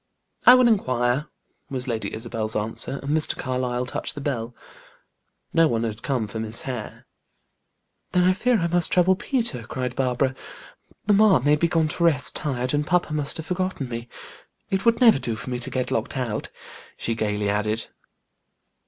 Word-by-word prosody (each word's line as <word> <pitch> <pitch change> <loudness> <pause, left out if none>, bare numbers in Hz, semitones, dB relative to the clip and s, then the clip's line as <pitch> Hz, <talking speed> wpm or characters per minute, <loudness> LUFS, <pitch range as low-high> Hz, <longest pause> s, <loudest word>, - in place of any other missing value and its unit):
"I 250 - +11
will 255 -1 +5
inquire," 130 - +1 0.4
was 130 -2 -2
Lady 115 -3 -2
Isabel's 110 -1 -3
answer, 115 +5 -3
and 145 +2 0
Mr. 160 - +3
Carlyle 125 -1 -2
touched 125 - -4
the - - -5
bell. 120 -4 -3 1.0
No 165 0 +5
one 115 -5 0
had 110 0 -4
come 125 -6 -1
for 110 +2 -6
Miss 110 0 -6
Hare. 125 -5 -6 1.1
"Then 180 - +3
I 185 +1 +4
fear 245 +5 +2
I 170 - 0
must 170 0 +1
trouble 185 +1 +4
Peter," 230 - -1
cried 125 +2 -4
Barbara. 130 0 +1 0.7
"Mamma 205 - +5
may 145 +1 +5
be 170 +3 +1
gone 165 -2 +2
to 170 - -2
rest, 155 -5 +3
tired, 130 -3 -2
and 145 +1 0
papa 175 -3 +1
must 145 -2 -1
have 160 - -6
forgotten 180 -7 -2
me. 120 0 -6 0.6
It 190 +2 0
would 230 - +4
never 230 - +6
do 115 -4 -2
for 125 +3 -7
me 125 - -2
to 125 - -3
get 130 -1 -2
locked 115 +5 -2
out," 120 -5 -3 0.5
she 115 - -1
gaily 105 -2 -1
added. 105 +2 0
130 Hz, 175 wpm, -24 LUFS, 115-170 Hz, 1.1 s, I